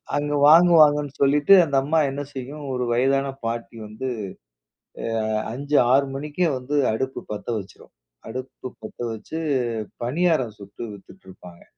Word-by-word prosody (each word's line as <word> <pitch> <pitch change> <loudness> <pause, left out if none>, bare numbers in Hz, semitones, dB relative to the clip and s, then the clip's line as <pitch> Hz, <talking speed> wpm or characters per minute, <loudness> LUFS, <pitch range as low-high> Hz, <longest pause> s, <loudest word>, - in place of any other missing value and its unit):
அங்கு 145 0 -1
வாங்குவாங்கன்னு 155 -3 +6
சொல்லிட்டு, 145 +6 +5
அந்த 140 -3 -3
அம்மா 155 +4 +1
என்ன 140 +1 -4
செய்யும் 140 +3 -7
ஒரு 125 -1 -1
வயதான 135 +3 +2 0.2
பாட்டி 115 0 -4
வந்து 110 +5 -6 1.3
அ - - +1 0.2
5 145 +4 -1 0.2
6 140 +1 +4
மணிக்கே 150 +5 -1
வந்து 130 +4 -3 0.2
அடுப்பு 130 +4 -3
பத்த 105 -2 -7
வச்சிரும். 100 -2 -12 0.4
அடுப்பு 130 +1 -7
பத்த 110 - -10
வச்சி 110 +8 -7 0.7
பணியாரம் 140 -4 0
சுட்டு 100 +3 -10
வித்திட்ருப்பாங்க. 95 -3 -14
135 Hz, 125 wpm, -23 LUFS, 115-150 Hz, 1.3 s, வாங்குவாங்கன்னு